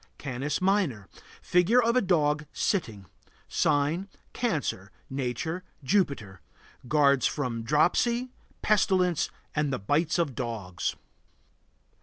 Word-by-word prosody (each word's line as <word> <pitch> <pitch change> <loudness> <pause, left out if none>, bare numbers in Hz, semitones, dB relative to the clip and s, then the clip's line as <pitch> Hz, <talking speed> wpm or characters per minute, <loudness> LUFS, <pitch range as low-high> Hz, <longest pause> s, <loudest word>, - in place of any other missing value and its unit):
CANIS 140 +2 -3
MINOR. 185 - +1 0.4
Figure 180 +8 +4
of 235 0 +2
a 255 - +4
dog, 150 -5 +1
sitting. 110 - -1 0.4
Sign: 150 +7 +1 0.2
Cancer. 150 - -2 0.2
Nature: 135 +7 -3 0.2
Jupiter. 135 - 0 0.5
Guards 140 -2 +4
from 125 -6 -2
dropsy, 205 - +2 0.3
pestilence, 185 -5 +2 0.3
and 150 -1 +1
the 135 - 0
bites 150 - +1
of 165 -6 0
dogs. 110 -8 -3
150 Hz, 100 wpm, -28 LUFS, 125-185 Hz, 0.5 s, Figure